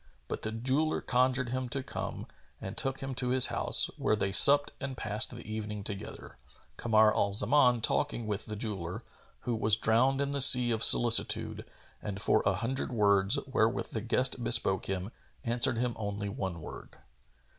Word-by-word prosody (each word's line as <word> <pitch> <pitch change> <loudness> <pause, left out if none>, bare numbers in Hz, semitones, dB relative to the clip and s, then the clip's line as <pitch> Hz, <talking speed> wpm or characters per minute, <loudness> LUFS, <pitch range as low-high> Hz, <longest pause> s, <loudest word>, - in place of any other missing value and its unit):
But - - -6
the 110 - -5
jeweller 130 +7 -2
conjured 125 0 -1
him 130 0 -4
to 135 +1 -5
come - - -7 0.3
and 95 - -8
took 135 0 -3
him 135 0 -5
to 125 0 -3
his 130 0 +5
house, - - +5
where - - 0
they 95 -2 -3
supped 145 +7 +6
and 135 -2 -7
passed 110 0 +2
the 120 - -12
evening 105 -1 -6
together, 100 - -7 0.4
Kamar 110 -2 +2
al 100 0 -1
Zaman 125 +1 +2
talking 120 0 -1
with 105 -1 -5
the 105 - -5
jeweller, 100 -1 -6 0.4
who 120 - -3
was 110 -1 +2
drowned 125 +5 +1
in 140 0 -2
the 140 -1 -1
sea 125 -2 +7
of 115 0 -1
solicitude 115 -1 +2 0.3
and 100 -1 -6
for 100 - +1
a 100 - +1
hundred 130 +7 -4
words, 100 +1 +1
wherewith 120 -4 -2
the 110 - -5
guest 125 +2 0
bespoke 115 -5 +2
him, 95 +2 -5 0.3
answered 120 0 0
him 120 0 -2
only 100 -1 -5
one 95 - -6
word. - - -12
115 Hz, 175 wpm, -29 LUFS, 105-130 Hz, 0.4 s, sea